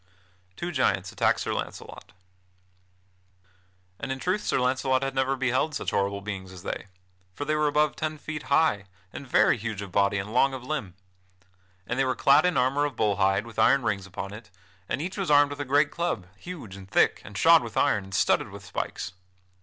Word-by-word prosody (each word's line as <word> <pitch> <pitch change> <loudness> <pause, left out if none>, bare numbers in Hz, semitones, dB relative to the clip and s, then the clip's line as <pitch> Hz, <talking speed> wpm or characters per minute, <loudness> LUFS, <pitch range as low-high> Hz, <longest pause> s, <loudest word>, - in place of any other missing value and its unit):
[Sidenote: 90 0 -35
Two 175 - -3
giants 95 - 0
attack - - +2
Sir - - -2
Launcelot] - - -7 1.9
And 135 - -4
in 130 - -2
truth 185 +8 -1
Sir - - 0
Launcelot 130 +1 +1
had 135 0 -2
never 135 0 +1
beheld 130 +4 0
such - - -2
horrible 100 0 0
beings 95 -2 -6
as 95 -1 -11
they; - - -5 0.5
for 145 - -4
they 155 - 0
were 150 0 +2
above 150 0 +2
ten 155 0 -3
feet 150 0 -6
high, 140 -9 +3 0.3
and 140 - -8
very 125 - +4
huge 105 -2 -4
of 95 - -9
body 100 +1 +2
and 100 +3 -4
long 135 +2 +3
of 130 - -8
limb. 125 -10 -4 0.9
And - - -3
they - - +4
were 130 - 0
clad 140 +6 +5
in 180 - 0
armor 135 +3 +2
of 145 - -4
bull 105 -2 +1
hide 95 +2 +2
with 115 -1 -8
iron 135 -1 +4
rings 95 -2 -1
upon 95 +1 -6
it, 105 -2 -11 0.4
and 130 +6 -1
each 185 +3 -5
was 190 - -2
armed 145 -1 +5
with 145 - -6
a - - -3
great 145 +3 +3
club, 170 - -2
huge 145 - -9
and 95 -1 -12
thick, - - +3
and - - -9
shod - - +6
with - - -7
iron, 100 - +2
and 95 0 -7
studded - - +2
with - - -11
spikes. 90 - -4
130 Hz, 210 wpm, -26 LUFS, 100-145 Hz, 1.9 s, shod